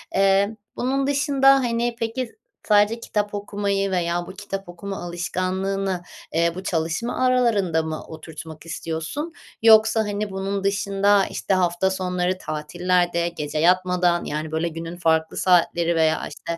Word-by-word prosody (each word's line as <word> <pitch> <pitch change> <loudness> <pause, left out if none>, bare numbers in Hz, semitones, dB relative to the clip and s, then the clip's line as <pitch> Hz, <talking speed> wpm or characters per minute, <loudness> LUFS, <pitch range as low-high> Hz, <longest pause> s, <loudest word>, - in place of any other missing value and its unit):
Eee, 195 +2 +3 0.2
bunun 270 +2 0
dışında, 280 -1 +3
hani, 240 -2 0
peki, 235 - -3 0.3
sadece 210 +2 +4
kitap 210 -2 -2
okumayı 200 -1 -1
veya 175 -1 -1
bu - - -7
kitap 195 -2 -6
okuma 195 +3 -6
alışkanlığını, 185 +2 -2 0.3
eee, 170 +1 +2
bu 185 - -6
çalışma 175 +9 -1
aralarında 220 -10 +2
mı 160 -1 -4
oturtmak 160 0 -10
istiyorsun 165 - -4 0.3
yoksa, 220 0 +6
hani, 205 0 -3
bunun 195 +1 -3
dışında, 200 0 +2
işte, - - -2
hafta 180 0 +2
sonları, 185 -1 -1
tatillerde, 175 +2 0
gece 155 -3 -5
yatmadan, 180 0 +2
yani, 155 +1 -4
böyle, 160 +2 0
günün 165 +1 -6
farklı 160 -2 +1
saatleri 170 -1 +3
veya, 160 -1 +2
işte, 165 +3 -6
185 Hz, 135 wpm, -23 LUFS, 170-205 Hz, 0.3 s, yoksa